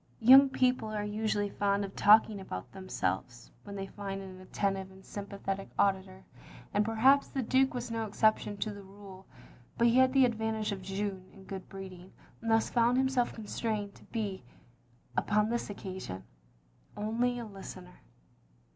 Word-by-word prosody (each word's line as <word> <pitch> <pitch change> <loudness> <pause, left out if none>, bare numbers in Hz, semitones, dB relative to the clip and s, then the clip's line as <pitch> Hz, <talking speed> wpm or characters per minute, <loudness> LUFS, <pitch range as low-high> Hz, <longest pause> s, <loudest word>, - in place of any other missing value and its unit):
Young 265 +4 +9
people 255 -3 +1
are 210 -1 -2
usually 210 -1 -1
fond 200 0 +1
of 195 - -10
talking 210 -1 +5
about 95 - -7
themselves, 120 - -4
when 200 -1 -8
they 195 -1 -4
find 195 0 -6
an 190 -1 -9
attentive 195 0 -2
and 190 0 -16
sympathetic 195 -1 -5
auditor, 190 -1 0 0.5
and 205 - +3
perhaps 240 +6 +4
the 265 - -3
Duke 260 +3 +2
was 245 -1 -4
no 225 -1 -2
exception 210 0 +1
to 210 +1 -2
the 200 - -9
rule. 195 -1 -13 0.5
But 235 - +3
he 235 - +3
had 260 0 +5
the 270 -2 +6
advantage 220 -2 -1
of 195 -1 -4
Jeanne 195 0 -4
in 195 - -15
good 190 -1 -8
breeding, 190 -1 -10 0.3
and 230 - -3
thus 225 0 +3
found 240 +1 +3
himself 265 -2 +2
constrained 215 -2 -3
to - - -18
be, 205 - -4 0.7
upon 210 0 +2
this 240 -2 -2
occasion, 185 - -6 0.7
only 235 +4 0
a 240 - -5
listener. 190 - -10
205 Hz, 160 wpm, -31 LUFS, 195-225 Hz, 0.7 s, Young